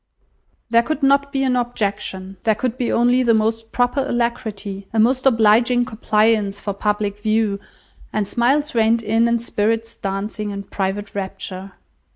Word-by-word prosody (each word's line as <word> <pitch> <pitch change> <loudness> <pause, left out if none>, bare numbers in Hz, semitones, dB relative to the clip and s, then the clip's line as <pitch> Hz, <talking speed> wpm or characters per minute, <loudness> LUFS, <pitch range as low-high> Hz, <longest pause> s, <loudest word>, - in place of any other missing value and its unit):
There 235 0 +6
could 285 +4 -3
not 280 +1 +3
be 270 -1 0
an 255 -1 +1
objection. 200 -5 -3
There 220 -1 +2
could 245 +2 -2
be 250 -2 -1
only 245 +2 +3
the 235 -2 +3
most 225 +1 -1
proper 245 +3 +1
alacrity, 230 -6 -3
a 225 - 0
most 255 +4 +3
obliging 235 +1 +4
compliance 215 -2 +1
for 200 - -3
public 205 0 -2
view; 215 -1 0 0.5
and 210 -2 -1
smiles 275 +8 +1
reined 225 0 +2
in 225 +2 +2
and 235 0 +1
spirits 225 0 -1
dancing 205 +2 -4
in 200 0 -5
private 200 +1 -3
rapture. 190 -1 -6
225 Hz, 155 wpm, -20 LUFS, 205-240 Hz, 0.5 s, There